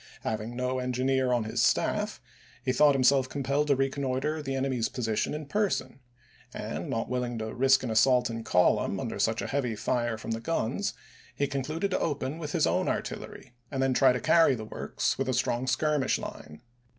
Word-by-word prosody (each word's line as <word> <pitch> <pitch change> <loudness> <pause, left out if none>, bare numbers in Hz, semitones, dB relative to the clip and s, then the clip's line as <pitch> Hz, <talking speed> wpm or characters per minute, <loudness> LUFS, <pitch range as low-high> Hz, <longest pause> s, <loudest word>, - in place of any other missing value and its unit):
Having 110 +2 -3
no 125 +1 -1
engineer 130 +1 0
on 120 -2 +2
his 110 - -1
staff - - +1 0.5
he - - +2
thought 145 +2 +5
himself 130 0 +3
compelled 140 +2 0
to 140 - +4
reconnoitre 135 +2 -1
the 135 -2 -3
enemy's 130 -3 0
position 115 +2 -1
in 155 0 -5
person, 205 -3 -1 0.6
and, - - -5
not 115 - -2
willing 125 -1 -2
to 110 0 -4
risk 130 +1 +4
an 120 - -2
assault 125 +3 +4
in 115 -1 -5
column 90 -4 +2
under - - -4
such - - +1
a - - -3
heavy 130 -5 -1
fire 120 +2 -1
from 115 - -6
the 115 - -1
guns, 165 - -1 0.4
he 140 - +1
concluded 155 +8 -2
to - - +1
open 145 0 -2
with 150 -3 -5
his - - +3
own - - +1
artillery - - -5 0.2
and 135 -1 -1
then 135 -1 +2
try 130 0 +5
to 125 - -1
carry 165 +2 +4
the 110 -2 -6
works - - -2
with - - -1
a - - +1
strong 120 +2 0
skirmish 150 0 +1
line. 75 0 -9
130 Hz, 190 wpm, -28 LUFS, 120-140 Hz, 0.6 s, thought